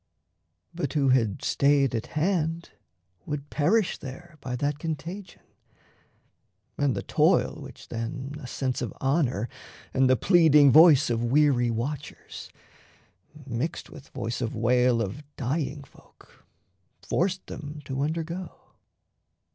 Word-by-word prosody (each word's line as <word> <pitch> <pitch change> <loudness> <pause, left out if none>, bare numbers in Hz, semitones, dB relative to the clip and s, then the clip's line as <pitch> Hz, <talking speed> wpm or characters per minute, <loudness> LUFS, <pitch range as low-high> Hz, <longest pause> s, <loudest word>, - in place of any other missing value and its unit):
But 155 -6 -3
who 140 -3 +2
had 115 -6 +1
stayed 140 -2 +2
at 115 0 -3
hand 165 -1 0 0.6
would 150 -1 -5
perish 200 +7 +1
there 155 +4 -10
By 125 -2 -4
that 145 +3 -2
contagion 165 +5 -6 1.3
and 145 -3 +1
the - - -4
toil - - +2
which - - -12
then 130 +5 -5
A 135 - -8
sense 130 0 -2
of 120 - -3
honour 135 - 0 0.5
and 130 -1 +3
the 130 - +5
pleading 150 - +5
voice 155 -2 +7
Of 115 0 0
weary 130 -1 +3
watchers, 135 +6 -5 1.0
mixed 130 +5 -4
with 140 -3 -12
voice 120 -1 -4
of 115 - -3
wail 120 +1 +2
Of 115 +9 -6
dying 140 +2 -3
folk, - - -22 0.6
forced 185 +2 -1
them 150 0 -8
to 135 +1 -3
undergo. 165 +4 -3
140 Hz, 125 wpm, -26 LUFS, 125-155 Hz, 1.3 s, voice